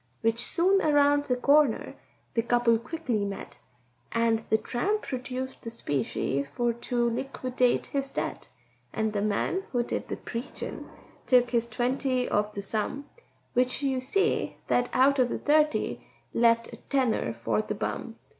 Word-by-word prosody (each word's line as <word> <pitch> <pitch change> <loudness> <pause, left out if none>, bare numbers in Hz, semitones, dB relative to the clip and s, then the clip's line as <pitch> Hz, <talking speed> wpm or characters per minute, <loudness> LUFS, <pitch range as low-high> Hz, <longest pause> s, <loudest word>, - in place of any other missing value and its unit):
Which 225 +1 +1
soon 380 +3 +3
around 290 -1 +4
the 255 -3 +1
corner 280 -1 +3 0.4
the 230 - +2
couple 240 -1 +3
quickly 245 -4 -2
met, 195 -8 -6 0.5
And 230 -1 +2
the 220 - +4
tramp 400 - -1
produced 260 0 -5
the 230 - -6
specie 140 - -1
for 240 -1 +1
to 240 0 -1
liquidate 255 0 0
his 275 -1 -3
debt; - - -4 0.5
And 220 -1 -1
the 205 - 0
man 215 - 0
who 245 -2 +1
did - - -3
the - - -4
preachin' 235 +2 -6 0.4
took 245 -1 +4
his 235 -1 +1
twenty 250 +2 0
of 210 +1 +1
the 200 - -4
sum, 250 +8 -3 0.4
Which 255 +3 +1
you 265 -2 +1
see 390 +12 0
that 245 0 +2
out 275 +2 +4
of 245 -1 +2
thirty 305 +1 +2 0.3
left 230 0 +3
a - - -7
tenner 250 - 0
for 115 -2 0
the - - -4
bum. - - -4
245 Hz, 150 wpm, -28 LUFS, 230-275 Hz, 0.5 s, around